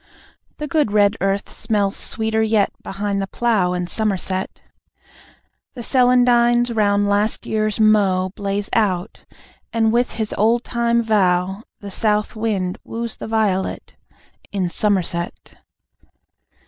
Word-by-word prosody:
The 300 Hz, -, -4 dB
good 295 Hz, -6 st, +1 dB
red 205 Hz, 0 st, +3 dB
earth 195 Hz, +1 st, 0 dB
smells 205 Hz, -3 st, 0 dB
sweeter 220 Hz, 0 st, -1 dB
yet, 220 Hz, -2 st, +2 dB
Behind 200 Hz, 0 st, -3 dB
the 195 Hz, -, -3 dB
plough, 205 Hz, -6 st, +1 dB
in 180 Hz, 0 st, -2 dB
Somerset. 190 Hz, -1 st, -2 dB, 1.2 s
The 240 Hz, -, -6 dB
celandines 245 Hz, -1 st, +3 dB
round 205 Hz, -1 st, +2 dB
last 205 Hz, +2 st, 0 dB
year's 215 Hz, 0 st, -1 dB
mow 195 Hz, -4 st, +3 dB
Blaze 200 Hz, 0 st, -2 dB
out... 195 Hz, -3 st, -1 dB, 0.5 s
and 225 Hz, -1 st, +2 dB
with 245 Hz, +1 st, +1 dB
his 220 Hz, -2 st, -3 dB
old 230 Hz, +3 st, +3 dB
time 235 Hz, -1 st, 0 dB
vow 190 Hz, -2 st, +1 dB, 0.2 s
The 200 Hz, -1 st, -7 dB
South 210 Hz, +2 st, 0 dB
Wind 205 Hz, -5 st, -2 dB
woos 230 Hz, 0 st, -5 dB
the -, -, -7 dB
Violet, 210 Hz, -4 st, -1 dB, 0.6 s
In 190 Hz, -3 st, -1 dB
Somerset. 175 Hz, -3 st, -1 dB
210 Hz, 120 wpm, -20 LUFS, 195-225 Hz, 1.2 s, red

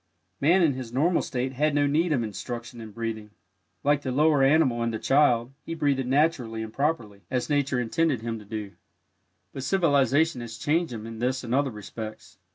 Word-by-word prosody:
Man 175 Hz, +6 st, +4 dB
in 155 Hz, -4 st, +3 dB
his 130 Hz, -3 st, -7 dB
normal 160 Hz, +8 st, +2 dB
state 130 Hz, 0 st, -3 dB
had 150 Hz, +3 st, +1 dB
no 145 Hz, 0 st, +3 dB
need 160 Hz, +4 st, +1 dB
of 130 Hz, -6 st, +1 dB
instruction 120 Hz, +2 st, -6 dB
in 110 Hz, -, -8 dB
breathing. 110 Hz, -1 st, -5 dB, 0.5 s
Like 145 Hz, 0 st, +3 dB
the 130 Hz, -, -3 dB
lower 150 Hz, +1 st, +3 dB
animal 135 Hz, -4 st, +3 dB
and 115 Hz, 0 st, 0 dB
the 110 Hz, -, -2 dB
child, 130 Hz, -2 st, +2 dB
he 165 Hz, -, -5 dB
breathed 140 Hz, -4 st, 0 dB
naturally 130 Hz, -6 st, +1 dB
and 110 Hz, 0 st, -8 dB
properly, 125 Hz, -9 st, -1 dB
as 125 Hz, +3 st, -2 dB
nature 140 Hz, -3 st, +1 dB
intended 130 Hz, +2 st, 0 dB
him 115 Hz, -1 st, -3 dB
to 105 Hz, -, -13 dB
do, 105 Hz, -1 st, -5 dB, 0.8 s
but 135 Hz, -, -5 dB
civilization 145 Hz, -3 st, +2 dB
has 115 Hz, -1 st, -7 dB
changed 160 Hz, +6 st, 0 dB
him 110 Hz, -2 st, -6 dB
in 115 Hz, -1 st, -8 dB
this 130 Hz, +2 st, -1 dB
and 120 Hz, 0 st, -3 dB
other 140 Hz, +1 st, +2 dB
respects. 110 Hz, 0 st, -9 dB
130 Hz, 190 wpm, -26 LUFS, 115-145 Hz, 0.8 s, Man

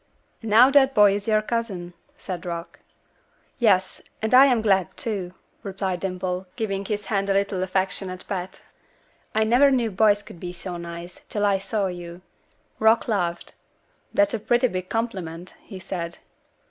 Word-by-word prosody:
"And 225 Hz, -, -5 dB
now 235 Hz, +5 st, +7 dB
that 270 Hz, -1 st, +4 dB
boy 205 Hz, -1 st, +6 dB
is 205 Hz, +1 st, -4 dB
your 215 Hz, -1 st, +3 dB
cousin," 205 Hz, -7 st, -3 dB, 0.2 s
said 185 Hz, -3 st, -6 dB
Rock. 170 Hz, -1 st, -6 dB, 0.8 s
"Yes; 190 Hz, -6 st, +2 dB, 0.2 s
and 220 Hz, +2 st, -2 dB
I 265 Hz, +2 st, +9 dB
am 240 Hz, -4 st, +2 dB
glad, 190 Hz, -5 st, +1 dB
too," 190 Hz, -5 st, -4 dB, 0.3 s
replied 190 Hz, -2 st, -3 dB
Dimple, 185 Hz, 0 st, -3 dB
giving 200 Hz, -5 st, -2 dB
his 205 Hz, 0 st, -3 dB
hand 200 Hz, -2 st, -1 dB
a -, -, +3 dB
little 200 Hz, -1 st, 0 dB
affectionate 185 Hz, 0 st, -2 dB
pat. 185 Hz, -1 st, -5 dB, 0.7 s
"I 220 Hz, -, +4 dB
never 245 Hz, +6 st, +5 dB
knew 245 Hz, -5 st, +1 dB
boys 205 Hz, +1 st, +3 dB
could 170 Hz, -, -13 dB
be 180 Hz, 0 st, -6 dB
so 180 Hz, 0 st, -7 dB
nice, 170 Hz, +1 st, -8 dB
till 205 Hz, -1 st, 0 dB
I 200 Hz, -1 st, +2 dB
saw 200 Hz, +1 st, -1 dB
you." 175 Hz, -1 st, -7 dB, 0.6 s
Rock 220 Hz, +1 st, +4 dB
laughed. 175 Hz, -6 st, -2 dB, 0.6 s
"That's 300 Hz, -3 st, +2 dB
a 230 Hz, -, -1 dB
pretty 240 Hz, +4 st, +2 dB
big 185 Hz, -2 st, -5 dB
compliment," 185 Hz, -7 st, -4 dB
he 195 Hz, -, -10 dB
said. 175 Hz, -2 st, -5 dB
195 Hz, 160 wpm, -24 LUFS, 180-220 Hz, 0.8 s, I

